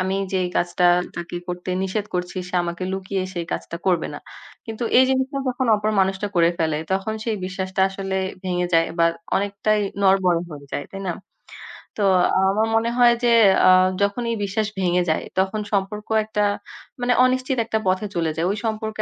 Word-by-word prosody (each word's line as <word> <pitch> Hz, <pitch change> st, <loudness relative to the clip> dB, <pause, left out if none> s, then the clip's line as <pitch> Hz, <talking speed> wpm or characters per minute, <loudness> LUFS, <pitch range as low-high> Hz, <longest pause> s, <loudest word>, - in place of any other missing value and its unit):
আমি 190 Hz, +1 st, 0 dB, 0.2 s
যেই 185 Hz, -1 st, 0 dB
কাজটা 175 Hz, 0 st, +1 dB, 0.3 s
তাকে 175 Hz, 0 st, -5 dB
করতে 180 Hz, +1 st, -4 dB
নিষেধ 200 Hz, +2 st, -2 dB
করছি 180 Hz, +1 st, -3 dB
সে 180 Hz, -, -9 dB
আমাকে 170 Hz, +1 st, -5 dB
লুকিয়ে 190 Hz, 0 st, -3 dB
সে 175 Hz, -, -2 dB
কাজটা 170 Hz, -, -4 dB
করবে 175 Hz, -4 st, +1 dB
না।" -, -, -7 dB, 0.5 s
কিন্তু 225 Hz, +1 st, -4 dB
এই 260 Hz, -, +7 dB
জিনিসটা 265 Hz, +1 st, 0 dB
যখন 255 Hz, +1 st, -1 dB
অপর 210 Hz, +1 st, -1 dB
মানুষটা 190 Hz, +2 st, 0 dB
করে 170 Hz, 0 st, +5 dB
ফেলে 160 Hz, -2 st, 0 dB
তখন 195 Hz, +3 st, -1 dB
সেই 225 Hz, -2 st, -1 dB
বিশ্বাসটা 190 Hz, 0 st, -3 dB
আসলে 195 Hz, 0 st, -4 dB, 0.3 s
ভেঙে 180 Hz, -1 st, 0 dB
যায় 165 Hz, 0 st, +4 dB
বা 165 Hz, -, +5 dB, 0.3 s
অনেকটাই 205 Hz, +2 st, 0 dB, 0.2 s
নড়বড়ে 190 Hz, -3 st, +3 dB
হয়ে 145 Hz, -2 st, -10 dB
যায়। 145 Hz, -, -3 dB
তাই 195 Hz, -, -6 dB
না? -, -, 0 dB, 0.9 s
তো 210 Hz, -, 0 dB, 0.5 s
আমার 215 Hz, +3 st, +1 dB
মনে 230 Hz, +1 st, +2 dB
হয় 240 Hz, -1 st, +6 dB
যে 235 Hz, -, +4 dB, 0.4 s
আ -, -, +8 dB, 0.3 s
যখনি 230 Hz, +4 st, -1 dB, 0.2 s
বিশ্বাস 210 Hz, +2 st, -1 dB
ভেঙে 180 Hz, -1 st, +2 dB
যায় 155 Hz, -, 0 dB
তখন 195 Hz, +3 st, 0 dB
সম্পর্ক 205 Hz, +2 st, -2 dB, 0.2 s
একটা 210 Hz, -1 st, -1 dB, 0.6 s
মানে 245 Hz, 0 st, +2 dB
অনিশ্চিত 255 Hz, 0 st, 0 dB
১ -, -, +3 dB
একটা 220 Hz, -1 st, -1 dB
পথে 185 Hz, +3 st, +1 dB
চলে 165 Hz, -2 st, 0 dB
যায়। 165 Hz, +2 st, 0 dB
ওই 210 Hz, -, -3 dB
সম্পর্কে 220 Hz, 0 st, -2 dB
195 Hz, 180 wpm, -22 LUFS, 180-220 Hz, 0.9 s, আ